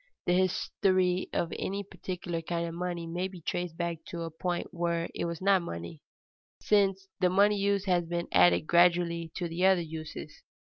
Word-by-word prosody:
_ -, -, -36 dB, 0.2 s
The 175 Hz, -, +2 dB
history 185 Hz, 0 st, +1 dB
of 170 Hz, -, -1 dB
any 200 Hz, +1 st, -2 dB
particular 180 Hz, -3 st, -5 dB
kind 170 Hz, +1 st, -2 dB
of 165 Hz, -, -6 dB
money 175 Hz, -1 st, -3 dB
may 175 Hz, +3 st, -2 dB
be 185 Hz, -2 st, -11 dB
traced 170 Hz, +1 st, -3 dB
back 170 Hz, -1 st, -2 dB
to 170 Hz, -1 st, -5 dB
a 165 Hz, -, -5 dB
point 175 Hz, +2 st, -3 dB
where 170 Hz, -1 st, -1 dB
it -, -, -2 dB
was 170 Hz, +1 st, -4 dB
not 195 Hz, -1 st, +4 dB
money, 85 Hz, -, -7 dB, 0.6 s
since 195 Hz, -2 st, +2 dB
which -, -, -28 dB
the 180 Hz, -1 st, +3 dB
money 200 Hz, +2 st, +4 dB
use 200 Hz, 0 st, +1 dB
has 175 Hz, -3 st, +1 dB
been 170 Hz, 0 st, -2 dB
added 90 Hz, -1 st, +5 dB
gradually 170 Hz, -1 st, +3 dB
to 175 Hz, -, -2 dB
the 170 Hz, +2 st, -3 dB
other 190 Hz, -2 st, +5 dB
uses. 160 Hz, -1 st, -8 dB
175 Hz, 190 wpm, -29 LUFS, 170-185 Hz, 0.6 s, added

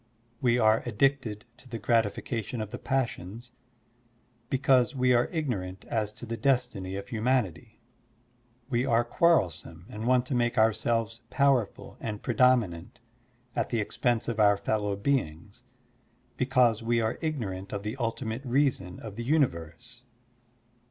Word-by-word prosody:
We 120 Hz, -1 st, +3 dB
are 110 Hz, -2 st, +4 dB
addicted 120 Hz, -4 st, 0 dB
to 130 Hz, -, -16 dB
the 115 Hz, -, -4 dB
gratification 115 Hz, +2 st, -1 dB
of 110 Hz, -1 st, -4 dB
the -, -, -6 dB
passions, 120 Hz, -3 st, -3 dB, 1.0 s
because 130 Hz, -1 st, +3 dB
we 125 Hz, -1 st, +3 dB
are 120 Hz, 0 st, +2 dB
ignorant 100 Hz, -, -3 dB
as 110 Hz, -3 st, -1 dB
to 120 Hz, -, -9 dB
the 115 Hz, 0 st, -4 dB
destiny 125 Hz, -9 st, 0 dB
of 100 Hz, 0 st, -5 dB
htmianity. 115 Hz, -3 st, -1 dB, 0.9 s
We 125 Hz, -2 st, 0 dB
are 120 Hz, -2 st, +3 dB
quarrelsome 110 Hz, -, +1 dB
and 110 Hz, +2 st, -5 dB
want 125 Hz, 0 st, +3 dB
to 130 Hz, -, -4 dB
make 120 Hz, 0 st, +1 dB
ourselves 115 Hz, +1 st, +1 dB
powerful 135 Hz, -7 st, +1 dB
and 105 Hz, -2 st, -5 dB
predominant 115 Hz, -10 st, +2 dB, 0.6 s
at -, -, -1 dB
the 115 Hz, -, 0 dB
expense 115 Hz, +2 st, 0 dB
of 115 Hz, -2 st, -2 dB
our 100 Hz, -1 st, +5 dB
fellow 105 Hz, 0 st, -1 dB
beings, 100 Hz, -, -2 dB, 0.7 s
because 125 Hz, -4 st, +2 dB
we 115 Hz, +1 st, +1 dB
are 110 Hz, +1 st, -1 dB
ignorant 100 Hz, -, -3 dB
of 100 Hz, -, -4 dB
the 105 Hz, +3 st, -3 dB
ultimate 115 Hz, 0 st, -3 dB
reason 125 Hz, -9 st, 0 dB
of 110 Hz, -2 st, -8 dB
the 120 Hz, -, -3 dB
universe. 120 Hz, -, -1 dB
115 Hz, 140 wpm, -28 LUFS, 105-125 Hz, 1.0 s, our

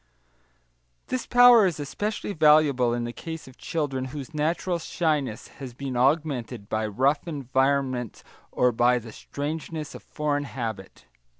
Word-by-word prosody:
This 255 Hz, -2 st, -2 dB
power 245 Hz, -4 st, +7 dB
is 170 Hz, -4 st, -3 dB
especially 205 Hz, +9 st, -3 dB
valuable 150 Hz, -6 st, +4 dB
in 120 Hz, 0 st, -1 dB
the 120 Hz, 0 st, -4 dB
case 160 Hz, +1 st, -7 dB
of 130 Hz, -, -15 dB
children 145 Hz, -6 st, -2 dB
whose 140 Hz, +3 st, -7 dB
natural 170 Hz, +3 st, -1 dB
shyness 150 Hz, -9 st, -1 dB
has 130 Hz, -4 st, -8 dB
been 135 Hz, -1 st, -5 dB
augmented 125 Hz, -5 st, 0 dB
by 110 Hz, 0 st, -1 dB
rough 135 Hz, -, +1 dB
environment 135 Hz, -, -1 dB, 0.3 s
or 125 Hz, 0 st, +3 dB
by 120 Hz, +2 st, +3 dB
the 115 Hz, -1 st, -8 dB
strangeness 155 Hz, +4 st, -5 dB
of -, -, -9 dB
foreign 145 Hz, -1 st, -2 dB
habit. 110 Hz, -, -6 dB
140 Hz, 135 wpm, -26 LUFS, 125-155 Hz, 0.3 s, power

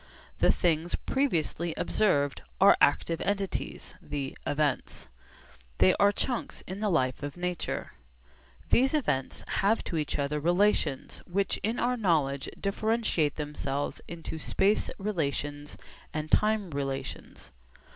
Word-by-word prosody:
The -, -, +5 dB
things 170 Hz, 0 st, +1 dB
previously 170 Hz, -, -1 dB
observed 145 Hz, -10 st, +1 dB, 0.2 s
are -, -, +8 dB
active 165 Hz, -1 st, +3 dB
entities, 200 Hz, -1 st, -2 dB
the 140 Hz, -2 st, -4 dB
'events.' 145 Hz, -2 st, -1 dB, 0.7 s
They 95 Hz, -, +5 dB
are 200 Hz, -, +6 dB
chunks 245 Hz, +4 st, -2 dB
in 185 Hz, +2 st, -6 dB
the 215 Hz, -1 st, 0 dB
life 130 Hz, -8 st, +1 dB
of 145 Hz, +1 st, -5 dB
nature. 180 Hz, -1 st, -3 dB, 0.8 s
These 265 Hz, +5 st, +4 dB
events 145 Hz, -, -1 dB
have 210 Hz, +3 st, +2 dB
to 165 Hz, -, -3 dB
each 150 Hz, -2 st, -1 dB
other 145 Hz, +1 st, -1 dB
relations 175 Hz, -3 st, +1 dB
which 195 Hz, +2 st, 0 dB
in 220 Hz, +5 st, -2 dB
our 250 Hz, +1 st, +1 dB
knowledge 150 Hz, -, +1 dB
differentiate 200 Hz, -7 st, 0 dB
themselves 145 Hz, -2 st, -3 dB
into 165 Hz, -1 st, -6 dB
space 200 Hz, +6 st, +2 dB
relations 145 Hz, -7 st, -3 dB, 0.4 s
and 155 Hz, 0 st, -3 dB
time 210 Hz, -4 st, +3 dB
relations. 135 Hz, -1 st, -5 dB
165 Hz, 120 wpm, -29 LUFS, 145-205 Hz, 0.8 s, are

